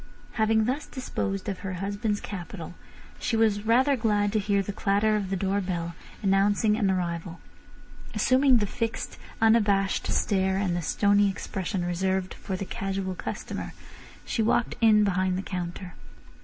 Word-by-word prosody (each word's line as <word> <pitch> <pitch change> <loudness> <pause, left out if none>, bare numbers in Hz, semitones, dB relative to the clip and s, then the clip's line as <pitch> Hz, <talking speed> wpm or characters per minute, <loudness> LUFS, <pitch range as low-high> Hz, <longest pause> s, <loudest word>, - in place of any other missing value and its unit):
Having 220 -1 +2
thus 265 +5 -2
disposed 195 -7 -3
of 195 -2 -3
her 190 -1 -4
husband's 205 +3 -2
capital, 175 -3 -7 0.5
she 230 - 0
was 215 -1 +2
rather 260 +5 +4
glad 210 -3 +1
to 215 - +3
hear 200 -1 +1
the 205 - -5
clatter 205 +1 +2
of 200 -3 -2
the 195 - 0
door 195 +2 0
bell, 170 -2 -3 0.3
announcing 205 +2 +3
an 210 -3 +1
arrival. 170 -2 -2 0.8
Assuming 255 +4 +4
the 210 - +1
fixed, 225 +3 -4 0.2
unabashed 205 -3 +3
stare 190 -1 +1
and 190 -3 0
the 175 - -1
stony 205 +4 +3
expression 190 -1 -3
reserved 185 +1 -1
for 190 - -5
the 195 - -4
casual 195 0 -3
customer, - - -5 0.5
she - - -1
walked 225 +2 +2
in 215 -2 +6
behind 185 -2 +1
the 190 - -3
counter. 180 -1 -5
200 Hz, 155 wpm, -27 LUFS, 190-215 Hz, 0.8 s, in